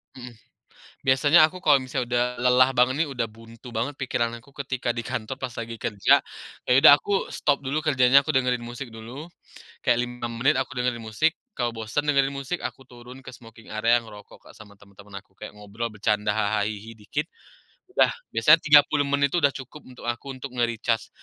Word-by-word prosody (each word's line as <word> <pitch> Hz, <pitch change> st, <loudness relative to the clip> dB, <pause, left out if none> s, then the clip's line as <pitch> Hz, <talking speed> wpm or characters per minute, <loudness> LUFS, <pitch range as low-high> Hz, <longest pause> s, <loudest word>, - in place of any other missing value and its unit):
Hmm, 120 Hz, -2 st, -10 dB, 0.7 s
biasanya 145 Hz, +5 st, +5 dB
aku 180 Hz, +3 st, -7 dB
kalau 145 Hz, -5 st, +5 dB
misalnya 130 Hz, -1 st, -3 dB
udah 120 Hz, 0 st, +2 dB, 0.2 s
lelah 125 Hz, +1 st, +5 dB
banget 130 Hz, +6 st, +2 dB
nih, -, -, -9 dB
udah 115 Hz, -3 st, -2 dB
buntu 115 Hz, +2 st, -14 dB
banget 120 Hz, +5 st, -3 dB
pikiran 120 Hz, -3 st, -2 dB
aku 140 Hz, -, -21 dB, 0.2 s
ketika 130 Hz, -2 st, -3 dB
di 120 Hz, -1 st, -2 dB
kantor 120 Hz, +4 st, -4 dB
pas 130 Hz, -3 st, -6 dB
lagi 115 Hz, -1 st, -6 dB
kerja, 105 Hz, -2 st, +3 dB, 0.5 s
ya -, -, -2 dB
udah 155 Hz, -, +10 dB
aku 200 Hz, +5 st, -2 dB
stop 145 Hz, -2 st, 0 dB
dulu 140 Hz, +2 st, -3 dB
kerjanya, 135 Hz, -1 st, +4 dB
aku 155 Hz, -, -1 dB
dengerin 125 Hz, -2 st, 0 dB
musik 120 Hz, +2 st, -7 dB
dulu, 120 Hz, +9 st, -10 dB, 0.5 s
kayak 120 Hz, -, +2 dB
5 120 Hz, -1 st, -6 dB
menit 125 Hz, +6 st, +1 dB
aku 130 Hz, 0 st, -7 dB
dengerin 125 Hz, -2 st, -1 dB
musik, 135 Hz, +10 st, 0 dB, 0.2 s
kalau 120 Hz, -2 st, -1 dB
bosen 115 Hz, +6 st, -3 dB
dengerin 140 Hz, -2 st, +2 dB
musik, 140 Hz, +5 st, -5 dB
aku 135 Hz, -, -7 dB
turun 125 Hz, +1 st, -14 dB
ke 125 Hz, -, -10 dB
smoking 115 Hz, -1 st, -14 dB
area 115 Hz, +2 st, +3 dB
ngerokok 110 Hz, -3 st, -11 dB
Kak -, -, -15 dB
sama 105 Hz, -2 st, -16 dB
teman-teman 100 Hz, 0 st, -14 dB
aku. 95 Hz, -, -35 dB
Kayak 105 Hz, +1 st, -11 dB
ngobrol 105 Hz, +3 st, -5 dB
bercanda 105 Hz, 0 st, -1 dB
haha 105 Hz, 0 st, 0 dB
hihi 110 Hz, +2 st, -8 dB
dikit, 145 Hz, +8 st, -3 dB, 0.7 s
udah, -, -, +4 dB, 0.2 s
biasanya 160 Hz, 0 st, +6 dB
30 145 Hz, -1 st, +4 dB
menit 140 Hz, 0 st, +1 dB
tuh 175 Hz, -, +1 dB
udah 145 Hz, -4 st, +2 dB
cukup 135 Hz, +3 st, -9 dB
untuk 125 Hz, -1 st, -14 dB
aku, 120 Hz, +3 st, -4 dB
untuk 130 Hz, 0 st, -8 dB
nge-recharge 115 Hz, -1 st, -1 dB
125 Hz, 190 wpm, -24 LUFS, 115-140 Hz, 0.7 s, udah